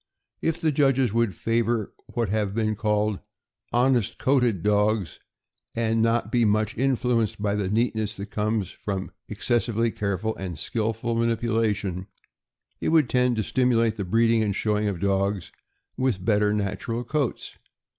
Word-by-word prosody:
If 165 0 0
the 160 - +1
judges 135 -5 +2
would 115 -5 +1
favor 115 -1 0 0.2
what 115 -4 0
have 105 -1 -1
been 110 -1 0
called 105 -1 0 0.5
"honest 120 -3 +2
coated" 125 -9 +2
dogs, 105 -4 +1 0.6
and 115 -1 +1
not 115 +1 +1
be 120 -2 +3
much 110 0 +1
influenced 125 -4 +1
by 100 -1 0
the 100 -2 -1
neatness 110 -1 0
that 100 +1 -7
comes 105 -2 -1
from 95 -2 -5 0.2
excessively 115 -1 0
careful 105 +2 -2
and 90 -4 -5
skillful 115 +4 -2
manipula 115 -1 +1
tion, 95 -1 -5 0.7
it - - -1
would 155 -6 +4
tend 125 -1 +3
to 110 - 0
stimulate 115 -2 +2
the 100 - -3
breeding 115 +4 +3
and 105 -3 0
showing 105 0 0
of 100 -4 -2
dogs 100 -1 0 0.5
with 120 -8 0
better 105 -1 +3
natural 105 +3 -2
coats. 140 0 -3
110 Hz, 145 wpm, -25 LUFS, 105-120 Hz, 0.7 s, would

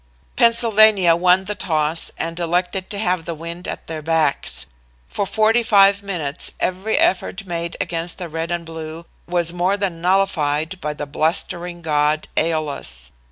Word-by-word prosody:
"Pennsylvania 215 -6 +5
won 180 +2 +3
the 210 - -2
toss 160 -4 0
and 165 +1 -3
elected 180 +2 -1
to 205 - -3
have 180 -5 0
the 170 - -4
wind 170 +2 -7
at - - -6
their 160 -1 -6
backs. 155 - 0 0.4
For 200 - -3
forty 220 +3 +3
five 200 -3 +5
minutes 170 -7 -1
every 190 +4 -1
effort 190 +2 0
made 170 -1 -4
against 170 0 -3
the 180 - -5
Red 165 +1 -4
and 175 -1 -3
Blue 160 0 -8 0.2
was 175 -1 +1
more 180 +3 +1
than 185 -5 -2
nullified 180 -2 0
by 150 0 -3
the 145 - -5
blustering 170 +3 -2
god 150 0 +1
Æolus. 145 - -1
170 Hz, 155 wpm, -20 LUFS, 160-190 Hz, 0.4 s, Pennsylvania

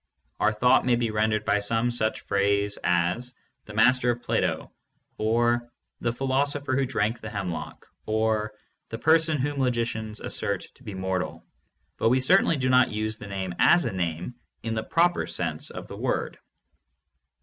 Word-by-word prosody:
Our - - +3
thought 125 +4 +4
may 125 -1 +3
be 120 -2 -1
rendered 110 0 0
by 105 - +2
some 115 +3 0
such 110 -2 -1
phrase 100 0 +1
as, 90 +9 0 0.3
"The 105 - -10
Master 125 +2 +4
of 120 0 -1
Plato," - - -1 0.5
or 120 +2 +1 0.3
"The 120 - 0
philos 135 +3 0
opher 140 -2 -3
who 135 -1 +1
drank 110 +1 -1
the 110 - -6
hemlock," 95 -5 -5 0.2
or 110 0 0 0.4
"The 115 - -5
person 160 +3 +3
whom 145 +1 -2
logi 125 -3 +1
cians 110 -2 -4
assert - - -2
to - - -21
be 100 - -7
mortal," 95 -1 -3 0.5
but 115 - +2
we 130 +2 +3
certainly 165 +4 +4
do 130 -1 0
not 130 -1 +5
use 110 +1 -2
the 105 - -8
name 95 -2 -4
as 175 0 +5
a - - -2
name 85 +3 -3 0.3
in 115 0 -2
the 110 - -1
proper 175 +8 +1
sense 80 -3 -3
of - - -8
the - - -9
word. - - -2
115 Hz, 170 wpm, -26 LUFS, 105-125 Hz, 0.5 s, not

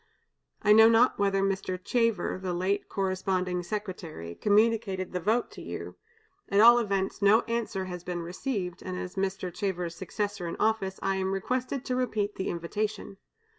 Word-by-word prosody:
I 210 - +6
know 220 +1 +8
not 230 +1 +4
whether 195 -1 +2
Mr. 195 -1 -1
Chever, 230 0 0
the 185 -2 -2
late 195 +3 -1
corresponding 185 -2 -1
secretary, 175 - -6
communicated 205 - +1
the 180 - -1
vote 220 +7 0
to - - -10
you; - - -7 0.5
at 200 - +3
all 235 +2 +8
events, 195 -3 -1
no 205 +3 +6
answer 230 -5 -2
has 180 -1 -6
been 175 -1 -4
received, 180 0 -4
and 185 -1 -5
as 180 0 -5
Mr. 190 -2 -2
Chever's 180 -3 -2
successor 200 0 -4
in 170 - -4
office, 215 -3 0
I 195 0 +1
am 190 0 -1
requested 255 +6 -2
to 255 - -1
repeat 215 -5 -1
the 190 - -3
invitation. 200 +4 -3
195 Hz, 165 wpm, -28 LUFS, 185-215 Hz, 0.5 s, know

